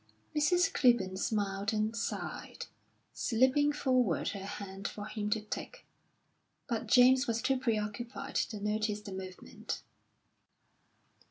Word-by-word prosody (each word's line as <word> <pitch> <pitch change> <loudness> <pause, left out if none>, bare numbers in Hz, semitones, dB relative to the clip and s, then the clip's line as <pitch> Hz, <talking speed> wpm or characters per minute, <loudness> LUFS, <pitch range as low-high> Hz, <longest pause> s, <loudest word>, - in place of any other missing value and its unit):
Mrs. 355 +6 +3
Clibborn 235 -8 +3
smiled 200 0 -1
and 215 +1 0
sighed, 230 - -4 0.5
slipping 260 +5 +3
forward 255 - +1
her 195 -2 -5
hand 200 -1 -5
for 205 - -6
him 210 -1 -3
to 215 +1 +1
take; 360 - -7 0.8
but 230 -4 -2
James 255 +2 +6
was 230 -1 0
too 265 +3 +1
preoccupied 235 +3 -2
to 215 - -1
notice 210 0 -1
the 205 - -8
movement. 185 -1 -6
220 Hz, 115 wpm, -32 LUFS, 205-255 Hz, 0.8 s, James